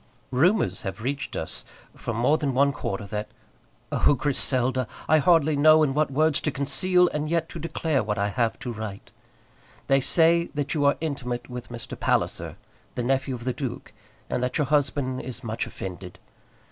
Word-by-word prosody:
Rumours 175 +11 +2
have 100 -1 -6
reached 140 +3 -3
us 80 - -5 0.3
from 115 - -4
more 125 +6 +3
than 140 -4 -1
one 140 +2 +4
quarter 100 -6 -4
that 105 +1 -4 0.6
Oh! 145 - +3
Griselda, 130 -2 0 0.2
I 155 +1 +5
hardly 155 0 +4
know 155 +2 +6
in 135 -3 +1
what 150 0 +1
words 155 +2 +2
to - - 0
conceal 165 +7 +3
and 150 0 -3
yet 165 0 0
to 170 - -7
declare 160 -1 -1
that 110 - -3
which 105 - -1
I 100 +1 +1
have 115 +1 0
to 125 -3 -4
write. 105 -2 -7 0.7
They 135 0 +3
say 170 +4 +3
that 145 -1 -1
you 145 -2 +1
are 140 - +4
intimate 125 -6 -4
with 125 -1 -7
Mr. 120 -2 -7
Palliser, - - 0 0.4
the 125 - -2
nephew 130 +1 0
of 120 - -9
the 130 0 -1
duke, 130 -3 -6 0.3
and - - -2
that 125 0 -1
your 150 - +2
husband 140 -2 0
is 130 - -7
much 115 0 -3
offended. 90 -1 -8
135 Hz, 185 wpm, -25 LUFS, 120-150 Hz, 0.7 s, know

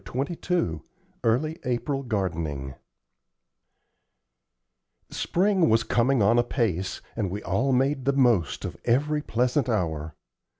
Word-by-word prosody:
CHAPTER 130 - -3
XXII 165 - -1 0.4
EARLY 150 +8 +1
APRIL 130 +3 -1
GARDENING 85 - -3 2.4
Spring 190 - +2
was 110 0 +3
coming 120 +1 +2
on 115 +4 +4
apace, 110 -7 -1
and 105 -5 -1
we 100 +3 -5
all 115 +9 0
made 135 +1 +1
the 140 - +3
most 120 - +2
of - - -6
every 150 +5 +2
pleasant 125 +1 0
hour. 80 -8 -2
120 Hz, 115 wpm, -26 LUFS, 95-140 Hz, 2.4 s, on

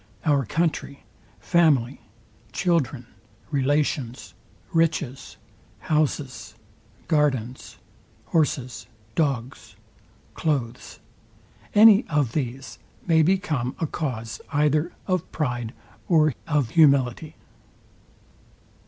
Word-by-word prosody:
Our 140 -4 +2
country, 150 0 -2 0.4
family, 145 -8 +2 0.5
children, 160 -8 0 0.5
relations, 135 - -1 0.4
riches, 155 -5 -1 0.4
houses, 150 -6 -2 0.5
gardens, 130 -6 -1 0.5
horses, 125 -9 -1 0.3
dogs, 135 -4 -2 0.6
cloaths; 135 -7 -3 0.8
any 215 +1 +8
of 145 -6 0
these 130 -1 -4 0.3
may 160 -2 +4
become 155 -8 0
a - - 0
cause 115 -8 -4
either 150 +3 +1
of 185 -2 -2
pride 120 -6 -2 0.4
or 155 -4 +4
of 145 -7 0
humility. 140 -1 +3
145 Hz, 75 wpm, -24 LUFS, 125-160 Hz, 0.8 s, any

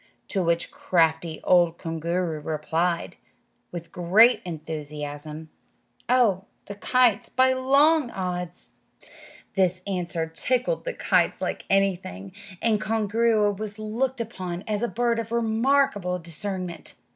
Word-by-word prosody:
To 195 - 0
which 170 -1 0
crafty 160 -2 +1
old 175 -2 +4
Koongooroo 165 -1 -2
replied, 165 +3 -1 0.5
with 170 -1 -7
great 200 +7 +5
enthusiasm, 150 -1 -6 0.6
"Oh, 220 -7 +3 0.2
the 200 - -7
kites, 240 +1 +2
by 260 +1 +3
long 275 +2 +3
odds!" 180 -3 -5 0.8
This 185 -1 +1
answer 175 -4 -2
tickled 250 - -1
the - - -2
kites - - +1
like - - -3
anything, 185 - 0 0.3
and 220 -2 +2
Koongooroo 215 -1 +1
was 215 -1 -5
looked 235 +5 -2
upon 185 -6 -5
as 210 -1 -1
a 240 - +1
bird 235 0 0
of 225 -1 -5
remarkable 230 -4 +1
discernment. 180 +1 -5
190 Hz, 115 wpm, -25 LUFS, 170-230 Hz, 0.8 s, great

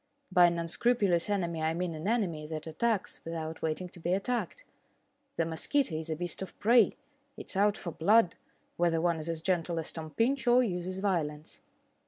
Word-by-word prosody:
By 180 -1 +7
an 170 0 -1
unscrupulous 180 +1 +1
enemy 170 -5 -1
I 160 +1 0
mean 175 -1 -2
an 155 +3 -5
enemy 180 -10 0
that 155 -1 -5
attacks 200 +6 -1
without 160 -1 -5
waiting 160 +3 -2
to 175 - -13
be 175 +2 0
attacked. 245 - -2 0.7
The 165 - +1
mosquito 170 - +1
is 160 +1 -3
a 160 - -1
beast 175 +2 -3
of 190 - -7
prey; 230 0 +5 0.4
it - - -4
is - - +1
out 205 +1 +3
for 175 - -5
blood, 190 +3 +4 0.4
whether 170 -1 +2
one 170 -1 +1
is 155 +2 -5
as 165 -1 -2
gentle 175 -2 0
as 160 0 -3
Tom 160 -1 -7
Pinch 250 - 0
or 245 +1 +6
uses 185 -2 -3
violence. 155 -6 -2
175 Hz, 190 wpm, -30 LUFS, 160-205 Hz, 0.7 s, By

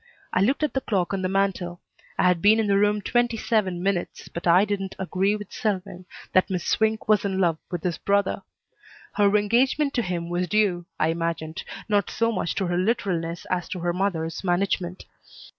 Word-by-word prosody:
I 185 - +2
looked 265 +9 +2
at 305 - 0
the 265 - 0
clock 195 -6 -1
on 195 - -1
the 185 - -1
mantel. 190 -3 -1 0.4
I - - +2
had 180 -2 +3
been 215 +2 +5
in 220 - +2
the 200 -1 +2
room 210 0 +2
twenty 240 0 +1
seven 190 -6 0
minutes, 195 -3 -2
but 170 - -5
I 180 +4 +6
didn't 195 -2 -3
agree 190 +2 0
with 210 -1 -8
Selwyn 185 -3 -3 0.3
that 185 - +4
Miss 180 -2 -2
Swink 220 0 +1
was 215 -1 +4
in 195 -2 -1
love 170 -4 +2
with 175 -3 -4
his 175 -3 -2
brother. 200 0 +1 0.7
Her 205 0 +4
engagement 260 +7 +2
to 245 - +1
him 175 -4 -3
was 175 +1 -1
due, 180 -3 +1
I 155 - +2
imagined, 165 0 -3 0.2
not 205 -2 +1
so 230 +1 +1
much 185 -5 -2
to 195 - 0
her 175 0 -1
literalness 180 -5 -1
as 180 -1 -1
to 185 - -4
her 175 0 0
mother's 175 -3 -2
management. 180 0 -1
190 Hz, 195 wpm, -25 LUFS, 175-210 Hz, 0.7 s, I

